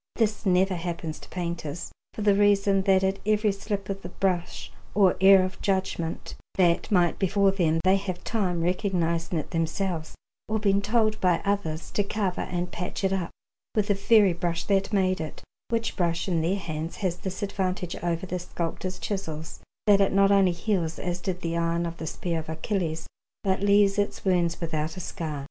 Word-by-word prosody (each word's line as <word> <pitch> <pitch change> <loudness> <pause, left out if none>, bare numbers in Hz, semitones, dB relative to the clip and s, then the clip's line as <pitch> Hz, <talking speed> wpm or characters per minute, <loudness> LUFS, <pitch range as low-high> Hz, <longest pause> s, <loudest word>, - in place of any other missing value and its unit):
This 215 -3 0
never 185 +1 +3
happens 170 -2 -4
to - - -14
painters, 170 -2 -4 0.2
for 215 - -3
the 205 -1 +5
reason 200 -1 +4
that 190 -1 +4
at 190 0 +1
every 215 0 +2
slip 200 0 -4
of 195 0 -4
the 180 - -7
brush 180 -2 -2 0.2
or 195 -3 +5
error 190 0 +8
of 185 - -7
judgment 190 -4 -2 0.2
that 175 -3 +2
might 175 -4 +2
befall 200 0 +3
them 165 -4 +1
they 190 +2 +5
have 190 -2 -5
time, 185 -7 -1
recognizing 170 -2 0
it 155 - -4
themselves 165 0 -2 0.3
or 220 - +1
being 200 -2 +2
told 215 0 +1
by 180 -2 +3
others, 195 -6 -2
to 205 - +1
cover 200 -2 -2
and 175 0 -3
patch 180 +3 -5
it 190 0 +2
up 185 -3 -1 0.5
with 210 -2 +1
the - - +5
very 200 -1 +4
brush 170 -1 -2
that 195 0 +1
made 185 -3 +2
it; 155 - -7 0.3
which 230 -1 -1
brush, 170 -1 0
in 170 -3 +1
their 170 +4 +1
hands, 160 -3 -4
has 185 -3 -2
this 190 +2 -5
advantage 185 -2 -2
over 170 +1 -2
the 180 0 -3
sculptor's 175 +1 -4
chisels, 160 -6 -5 0.3
that 200 -1 +6
it 195 - +3
not 195 0 +4
only 195 -2 +5
heals, 170 -2 -1
as 175 0 -3
did 185 -2 -3
the 165 0 -2
iron 170 0 0
of 170 0 -5
the 160 - -5
spear 165 +1 -2
of 160 - -8
Achilles, 165 0 -2 0.4
but 190 -1 +1
leaves 200 0 +4
its 205 - -2
wounds 175 -3 +2
without 160 0 -2
a - - -4
scar. 160 -4 -4
185 Hz, 190 wpm, -26 LUFS, 170-200 Hz, 0.5 s, error